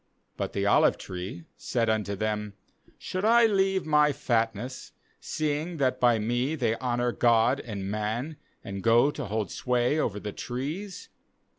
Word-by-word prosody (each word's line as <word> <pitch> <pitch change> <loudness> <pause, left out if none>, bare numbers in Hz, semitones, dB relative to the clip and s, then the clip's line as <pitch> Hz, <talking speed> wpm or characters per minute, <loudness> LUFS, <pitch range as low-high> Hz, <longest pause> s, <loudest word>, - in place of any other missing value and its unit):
9But - - -3
the - - -1
olive - - +4
tree 90 -1 -7
said 115 -2 -1
unto 105 -2 0
them: 105 0 -2 0.4
Should 185 +1 -4
I 230 +2 +6
leave 195 -3 +2
my 150 -1 +4
fatness, 115 0 -2 0.3
seeing 155 +3 -2
that 130 -3 +1
by 120 -2 +4
me 120 +7 0
they 115 -6 0
honour 120 -1 0
God 115 0 +3
and 100 -5 -6
man; 110 +9 -3 0.3
and 100 0 -6
go 120 +6 +4
to 145 -2 -5
hold 105 -2 -2
sway 125 +4 +1
over 105 -8 -1
the 105 0 -6
trees? 155 +11 -5
120 Hz, 150 wpm, -27 LUFS, 110-150 Hz, 0.4 s, I